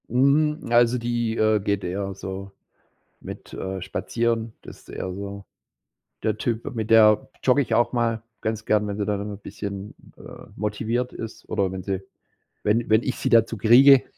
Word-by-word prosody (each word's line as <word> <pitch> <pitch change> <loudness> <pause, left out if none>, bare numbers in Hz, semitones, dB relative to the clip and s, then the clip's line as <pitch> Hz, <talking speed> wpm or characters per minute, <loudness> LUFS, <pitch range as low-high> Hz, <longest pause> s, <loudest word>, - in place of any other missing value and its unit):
Hm, 150 +5 +2
also, 120 +1 +4
die, 120 -1 -1
äh, 110 0 +3
geht 100 0 -1
eher 95 +2 -3
so 95 +1 -7 0.7
mit, - - -10
äh, 95 0 -4
spazieren, 115 +1 -1
das - - -12
ist - - -23
eher 95 - -5
so 100 +1 -7 0.8
der 110 -1 0
Typ. 115 +1 -3
Mit 110 -2 -3
der 110 -1 +6
jogge 130 +2 +4
ich 120 - -2
auch 120 +1 +2
mal 115 -2 0 0.2
ganz 110 0 -3
gern, 105 -1 +2
wenn 100 -1 -3
sie 105 -1 -2
dann 105 -1 -1
'n 100 -1 -6
bisschen, 100 0 -7 0.2
äh, - - -12
motiviert 115 +4 -2
ist 115 0 -8
oder 95 -2 0
wenn 95 -1 -5
sie 95 0 -2 0.6
wenn 115 +3 +1
wenn 110 +2 +4
ich 130 - -2
sie - - -1
dazu 115 -1 +4
kriege, 130 +6 +7
110 Hz, 175 wpm, -24 LUFS, 100-120 Hz, 0.8 s, kriege